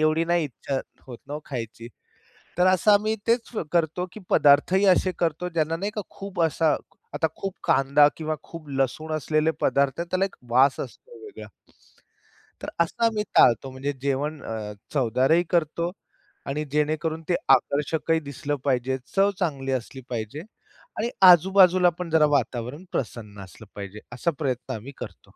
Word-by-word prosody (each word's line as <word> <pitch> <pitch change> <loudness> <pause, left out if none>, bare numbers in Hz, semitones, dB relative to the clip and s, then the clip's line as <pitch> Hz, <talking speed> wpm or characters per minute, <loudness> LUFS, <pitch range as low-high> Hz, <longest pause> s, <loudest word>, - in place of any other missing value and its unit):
एवढी 155 +1 +2
नाही 170 -1 +1
इच्छा 135 +2 -4 0.3
होत 120 -3 -9
ना 145 - -4
वो 150 - -5
खायची. 115 -3 -6 0.7
तर 180 - +4
असं 185 +3 +4
आम्ही 215 +2 +3
तेच 230 0 +1 0.2
करतो 170 +1 0
की 215 - -10
पदार्थही 180 +7 +4
असे 185 0 0
करतो 170 +1 0
ज्यांना 165 -1 -1
नाही 200 +4 -3
का - - 0
खूप 195 -3 -4
असा 160 -2 +2 0.4
आता 155 +2 +1
खूप 195 -1 -4
कांदा 140 +2 +4
किंवा 155 -1 -2
खूप 165 -3 -11
लसूण 135 +3 -2
असलेले 155 +1 +1
पदार्थ 140 +2 +1
आहेत 170 0 -5
त्याला 185 +1 +1
एक 195 - -6
वास 130 +3 +4
असतो 485 -2 -9
वेगळा. 415 - -10 1.1
तर - - -5
असं 170 +7 0
आम्ही 215 -2 +1
टाळतो. 125 +3 +5
म्हणजे 135 +2 -3
जेवण 140 +2 -2
अ, 110 -2 -5 0.2
चवदारही 135 +5 +2
करतो 170 0 0 0.6
आणि 150 +2 -2
जेणेकरून 155 +2 -1
ते 175 - +3
आकर्षकही 150 +5 +2
दिसलं 145 0 -4
पाहिजे, 130 0 +1 0.2
चव 200 +1 +4
चांगली 140 -7 -2
असली 130 +1 -4
पाहिजे 120 +4 -4 0.6
आणि 235 +2 -1 0.2
आजूबाजूला 180 +1 +6
पण 175 -2 -4
जरा 160 -1 +4
वातावरण 125 +4 -2
प्रसन्न 105 -4 -5
असलं 95 +4 -14
पाहिजे. 100 +1 -7
असा 150 +7 0
प्रयत्न 130 -4 -2
आम्ही 115 +5 -8
करतो. - - -10
150 Hz, 155 wpm, -25 LUFS, 135-175 Hz, 1.1 s, आजूबाजूला